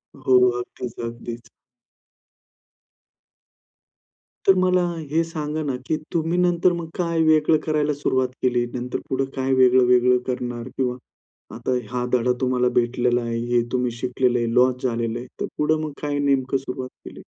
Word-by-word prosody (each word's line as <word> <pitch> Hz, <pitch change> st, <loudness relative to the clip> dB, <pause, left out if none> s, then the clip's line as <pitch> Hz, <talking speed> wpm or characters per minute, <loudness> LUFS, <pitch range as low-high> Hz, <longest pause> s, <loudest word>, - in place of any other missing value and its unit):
हो, 130 Hz, -1 st, 0 dB
हो. 125 Hz, 0 st, +5 dB
अगदीच, 120 Hz, 0 st, -7 dB
अगदीच. 115 Hz, 0 st, -7 dB, 3.0 s
तर 195 Hz, -, +8 dB
मला 185 Hz, 0 st, +3 dB, 0.3 s
हे 165 Hz, +3 st, +2 dB
सांगा 155 Hz, -2 st, -4 dB
ना, 140 Hz, -3 st, -2 dB
की 155 Hz, -, 0 dB, 0.2 s
तुम्ही 165 Hz, +1 st, 0 dB
नंतर 175 Hz, 0 st, +3 dB
मग 170 Hz, -2 st, -5 dB
काय 170 Hz, -2 st, 0 dB
वेगळं 155 Hz, 0 st, +4 dB
करायला 150 Hz, -1 st, +1 dB
सुरुवात 130 Hz, -2 st, 0 dB, 0.2 s
केली, 120 Hz, -1 st, +2 dB
नंतर 125 Hz, 0 st, -3 dB
पुढं 135 Hz, 0 st, 0 dB
काय 135 Hz, 0 st, 0 dB
वेगळं-वेगळं 125 Hz, -1 st, +5 dB
करणार? 120 Hz, -1 st, -3 dB
किंवा 125 Hz, -2 st, 0 dB, 0.6 s
आता 125 Hz, +2 st, -1 dB
हा 125 Hz, 0 st, -1 dB
धडा 125 Hz, 0 st, +3 dB
तुम्हाला 125 Hz, -1 st, +2 dB
भेटलेला 120 Hz, 0 st, +1 dB
आहे, 115 Hz, 0 st, -3 dB, 0.2 s
हे 120 Hz, -, +4 dB
तुम्ही 125 Hz, -1 st, 0 dB
शिकलेलं 125 Hz, -1 st, +1 dB
आहे, 115 Hz, -1 st, -1 dB
लॉस 125 Hz, 0 st, +3 dB
झालेलं 115 Hz, -2 st, -1 dB
आहे, 125 Hz, -, -9 dB
तर -, -, +1 dB
पुढं 155 Hz, +1 st, +1 dB
मग 155 Hz, -, -4 dB
काय 145 Hz, -1 st, -1 dB
नेमकं 135 Hz, -1 st, +1 dB
सुरुवात 130 Hz, -1 st, -6 dB, 0.2 s
केली? -, -, -10 dB
130 Hz, 150 wpm, -23 LUFS, 125-150 Hz, 3.0 s, तर